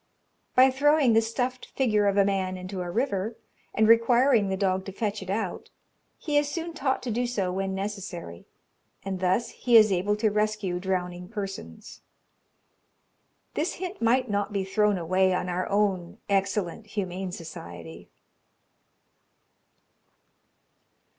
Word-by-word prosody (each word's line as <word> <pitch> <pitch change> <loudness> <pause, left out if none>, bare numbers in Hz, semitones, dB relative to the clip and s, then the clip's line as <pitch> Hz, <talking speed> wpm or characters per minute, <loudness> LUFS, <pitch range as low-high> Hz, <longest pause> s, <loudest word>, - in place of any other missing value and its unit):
By 260 +1 +7
throwing 285 -1 +4
the 225 - +5
stuffed 245 +3 -3
figure 215 -6 +2
of 200 0 +1
a 200 - +5
man 190 -2 -1
into 185 +1 -6
a 175 - -4
river, 220 0 -1 0.4
and 220 0 +2
requiring 230 -1 +4
the 190 - -1
dog 190 -1 0
to 195 - -6
fetch 205 +1 -3
it 190 - -8
out, 200 -2 -3 0.5
he 295 -2 +1
is 290 -1 -1
soon 335 +2 -4
taught 270 -4 -1
to 245 - -3
do 245 +3 0
so 195 -7 -1
when 190 +1 -2
necessary, 190 - -6 0.6
and 190 -1 -3
thus 185 +6 +1
he 240 -2 +4
is 215 -2 +6
able 190 +3 +1
to 215 0 +1
rescue 210 -4 -1
drowning 180 -1 -3
persons. 195 - -7 1.5
This 320 +4 -1
hint 370 +2 -6
might 250 +3 +3
not 205 -1 -1
be 200 -1 -1
thrown 210 +1 +2
away 185 +2 +2
on 180 - -2
our 180 +1 -2
own 195 -2 0
excellent 195 +1 -1
Humane 190 -2 -4
Society. 85 - -9
200 Hz, 140 wpm, -27 LUFS, 185-230 Hz, 1.5 s, By